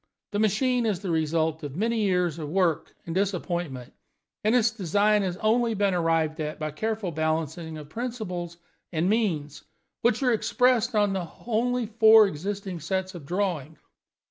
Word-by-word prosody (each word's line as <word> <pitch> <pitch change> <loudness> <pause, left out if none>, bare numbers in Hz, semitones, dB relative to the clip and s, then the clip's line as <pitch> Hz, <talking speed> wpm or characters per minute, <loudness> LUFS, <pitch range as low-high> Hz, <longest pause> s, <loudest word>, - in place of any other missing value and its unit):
The 205 - -1
machine 235 +3 +2
is 200 -4 -1
the 190 -4 -3
result 160 0 0
of 145 -2 -6
many 225 +5 0
years 180 -5 +1
of 150 -2 -5
work 175 -2 0
and 165 - -4
disappointment, 175 -8 -2 0.5
and 215 +3 +3
its 235 -2 +4
design 205 +1 +2
has 185 -2 -2
only 230 +2 +2
been 200 -1 +1
arrived 165 -2 +1
at 155 0 -3
by 155 -1 -3
a - - -8
careful 215 +3 -2
balancing 160 +1 -2
of 150 -1 -9
principles 180 -5 -5 0.3
and 165 0 0
means, 170 -10 -1 0.4
which 240 +2 +2
are 250 -2 +3
expressed 245 +1 +2
on 205 -2 +3
the 180 -4 -3 0.2
only 245 +1 0
four 220 0 +7
existing 195 +1 -4
sets 185 +4 -2
of 165 -6 -10
drawings. 175 -5 -2
190 Hz, 165 wpm, -26 LUFS, 160-220 Hz, 0.5 s, four